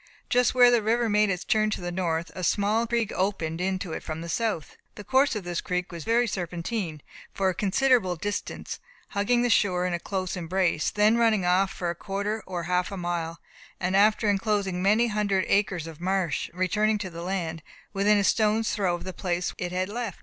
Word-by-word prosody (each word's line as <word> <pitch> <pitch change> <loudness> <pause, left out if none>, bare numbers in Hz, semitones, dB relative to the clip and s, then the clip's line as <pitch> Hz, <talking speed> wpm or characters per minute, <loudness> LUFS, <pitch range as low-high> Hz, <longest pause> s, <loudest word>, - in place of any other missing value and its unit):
Just 250 +1 +3
where 245 -1 +7
the 240 -2 +4
river 230 +2 +1
made 210 0 +3
its 180 -2 -2
turn 215 -2 +2
to - - -2
the 175 -1 -4
north, 170 -2 -2
a 185 - -6
small 210 +5 +1
creek 235 -2 0
opened 180 -4 -1
into 185 -2 -2
it - - -4
from 155 0 -5
the 170 - -6
south. 210 -4 -2 0.2
The 210 - -8
course 265 +2 +3
of 210 - -3
this 175 -1 -3
creek 180 0 -2
was 170 -2 -7
very 235 +2 +3
serpentine; 175 -3 -4 0.3
for 195 -1 0
a - - 0
considerable 205 -1 +2
distance 205 +5 -4 0.3
hugging 240 +4 +1
the 245 - +2
shore 180 -4 +2
in 180 - -1
a 175 - -1
close 185 0 -3
embrace, 175 -2 0
then 210 +2 +3
running 220 -5 +3
off 185 +2 +3
for 175 -1 -3
a - - -6
quarter 205 +4 -3
or 180 -2 -4
half 180 +2 0
a 195 - -5
mile, 170 -2 -3 0.4
and 185 +1 0
after 215 +2 +4
enclosing 200 -2 0
many 210 +5 +4
hundred 205 -3 0
acres 190 -5 +1
of 165 -1 -10
marsh, 185 -2 -1
returning 210 +5 +1
to 190 -3 -5
the 170 0 -7
land, 170 -3 -3 0.3
within 205 +1 +3
a 200 - +2
stone's 220 +2 +2
throw 190 -4 +1
of 175 - -8
the 185 0 -6
place 180 -1 -2
which - - -14
it - - -9
had 185 +1 -1
left. 225 -2 -5
195 Hz, 210 wpm, -26 LUFS, 175-215 Hz, 0.4 s, where